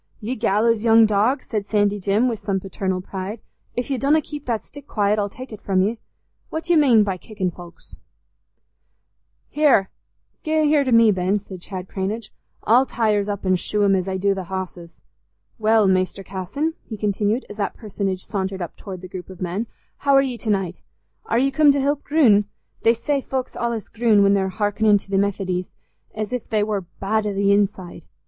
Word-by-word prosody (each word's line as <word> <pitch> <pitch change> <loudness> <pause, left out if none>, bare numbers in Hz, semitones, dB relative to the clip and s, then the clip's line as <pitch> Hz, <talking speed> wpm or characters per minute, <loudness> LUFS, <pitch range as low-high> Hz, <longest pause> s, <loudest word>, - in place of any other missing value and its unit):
"Ye 230 +3 -3
gallows 220 0 +2
young 225 -1 +6
dog," 215 +6 +1
said 210 -3 -4
Sandy 205 -1 +2
Jim, 200 +6 +2
with 230 -4 -3
some 195 -2 0
paternal 190 -1 -3
pride, 195 +4 -6 0.4
"if 245 +3 -3
ye 265 - 0
donna 290 +4 +3
keep 295 -2 -8
that 225 -3 -1
stick 285 -1 -13
quiet, 210 0 +1
I'll 205 0 -1
tek 255 +5 -10
it 210 - -9
from 190 -1 +1
ye. 220 +3 -1 0.5
What 320 +1 -4
dy'e 345 0 +2
mane 255 -8 +5
by 195 -2 -2
kickin' 190 -2 -4
foulks?" 175 0 -14 1.5
"Here! 275 -11 +3 0.5
Gie 310 - -2
him 315 0 +3
here 295 -1 +4
to 260 - -1
me, 230 -2 +6
Jim," 190 +2 0
said 185 -2 -9
Chad 185 0 -7
Cranage; 200 +4 -4 0.3
"I'll 250 +4 +4
tie 225 -2 +1
hirs 205 0 0
up 200 -1 -4
an' 185 0 +3
shoe 210 +3 -1
him 195 -1 +4
as 185 0 -1
I 190 0 -1
do 200 +1 +2
th' 190 -2 -5
hosses. 180 -2 -7 0.6
Well, 220 -1 +4
Mester 185 +1 +1
Casson," 195 - -3
he 220 - -7
continued, 210 +3 0
as 205 - -10
that 200 -2 -2
personage 195 -4 -3
sauntered 190 -2 -3
up 175 -3 -5
towards 190 -3 -8
the - - -6
group 185 0 -8
of 185 -1 -11
men, 185 +5 -3 0.3
"how 280 -1 +2
are 275 - +7
ye 260 -3 -3
t' 225 - -5
naight? 190 -4 -1 0.5
Are 230 - +1
ye 270 +3 +2
coom 300 0 +5
t' 280 - 0
help 285 +1 0
groon? 240 -10 +4 0.4
They 230 +1 +4
say 280 +4 -1
folks 260 -1 -4
allays 235 -3 -2
groon 220 -3 +3
when 200 0 +4
they're 190 -1 +1
hearkenin' 205 +1 +2
to - - -18
th' 195 - +3
Methodys, 185 -2 -2 0.5
as 215 +2 -4
if 250 - -4
they 215 -2 +2
war 205 -4 -2
bad 210 +2 0
i' 205 - -2
th' - - -6 0.2
inside. 195 -4 -1
210 Hz, 205 wpm, -22 LUFS, 190-235 Hz, 1.5 s, are